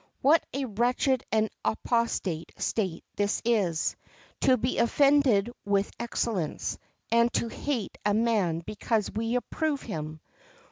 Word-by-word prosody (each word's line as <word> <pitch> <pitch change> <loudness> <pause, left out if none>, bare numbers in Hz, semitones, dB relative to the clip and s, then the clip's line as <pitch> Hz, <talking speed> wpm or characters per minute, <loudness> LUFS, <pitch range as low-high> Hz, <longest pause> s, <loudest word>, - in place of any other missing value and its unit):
What 310 +4 +5
a 275 0 -2
wretched 245 +3 +1
and 220 0 +3 0.2
apostate 215 -8 -1
state 190 -7 -1 0.2
is 205 +1 +1
this—to 220 +4 0
be 250 +3 -1
offended 255 -4 +4
with 200 0 +1
excellence, 220 -8 -2 0.3
and 235 +1 +4
to 230 - 0
hate 250 -4 -3
a 205 0 +2
man 210 -8 +1
because 215 0 -1
we 225 +2 -1
approve 290 +3 -1
him! 155 -6 -5
225 Hz, 120 wpm, -28 LUFS, 200-250 Hz, 0.3 s, What